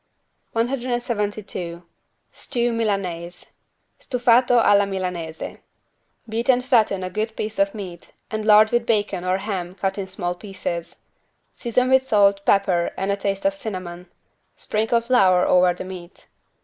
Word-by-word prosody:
172 225 -8 -2 0.5
STEW 240 -3 -2
MILANAISE 185 -6 -3 0.5
(Stufato 245 0 +3
alla 205 -3 +4
milanese) 180 -4 -5 0.7
Beat 230 +3 -3
and 250 -1 +4
flatten 220 -7 +2
a 185 - -3
good 220 +1 -3
piece 215 -1 -4
of 195 +2 +1
meat 180 -5 -8 0.2
and 215 0 -2
lard 215 0 +6
with 240 -1 +1
bacon 205 -5 0
or 185 +1 +1
ham 190 -3 -4
cut 195 +1 -2
in 190 - -4
small 180 -2 -3
pieces. 180 -3 -6 0.5
Season 250 +1 0
with 265 0 +5
salt, 200 -5 +3
pepper 185 -4 +3
and 195 +1 -1
a - - +1
taste 200 +3 -3
of 295 - +3
cinnamon. 185 -9 -6 0.5
Sprinkle 225 +2 0
flour 195 -7 +4
over 180 0 +4
the 175 - -6
meat. 180 -1 -10
200 Hz, 135 wpm, -22 LUFS, 185-230 Hz, 0.7 s, lard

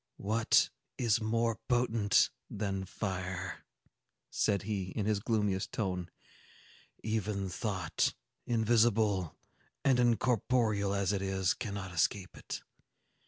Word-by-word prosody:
"What 110 +3 +3 0.3
is 115 -3 +2
more 115 +1 0
potent 115 -4 +3 0.2
than 100 -2 -2
fire!" 95 -1 -4 0.7
said 100 -3 +1
he, 100 -2 -2
in 100 +3 -3
his 105 -1 +1
gloomiest 105 -3 0
tone. 90 -4 -2 0.9
"Even 105 -3 -1
thought, 95 0 -1 0.3
invisible 110 -5 +2 0.5
and 130 -3 +4
incorporeal 115 -3 +2
as 100 0 +1
it 100 - -1
is, 95 -2 +1
cannot 100 -5 -5
escape 90 +3 0
it. - - -6
105 Hz, 105 wpm, -32 LUFS, 95-115 Hz, 0.9 s, and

